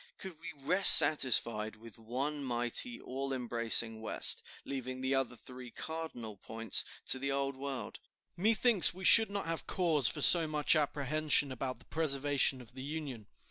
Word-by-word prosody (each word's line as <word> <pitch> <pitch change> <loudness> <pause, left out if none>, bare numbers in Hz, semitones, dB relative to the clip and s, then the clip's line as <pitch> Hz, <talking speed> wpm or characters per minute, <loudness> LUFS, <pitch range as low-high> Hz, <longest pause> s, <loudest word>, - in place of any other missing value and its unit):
Could 185 -5 -11
we 170 +1 -9
rest 185 +7 +6
satisfied 115 -6 +1
with 115 0 -16
one 135 +6 -5
mighty, 120 - -3
all 135 +2 -7
embracing 115 -3 +1
West, 110 - -2 0.2
leaving 130 -2 -7
the 130 +1 -2
other 135 -2 -2
three 125 +1 -13
cardinal 125 -8 -9
points 115 +3 +2 0.2
to 130 - +1
the 140 +1 -4
Old 140 0 -3
World, 135 0 -7 0.4
methinks 215 -1 +3
we 190 0 -9
should 225 +2 +7
not 200 0 -5
have 165 0 -5
cause 160 - -1
for 150 - -1
so 170 -2 +7
much 150 +1 +2
apprehension 150 -1 -1
about 130 0 -6
the - - -22
preservation 140 -4 0
of 120 0 -17
the 130 - -11
Union." 140 -7 -8
135 Hz, 160 wpm, -31 LUFS, 125-155 Hz, 0.4 s, should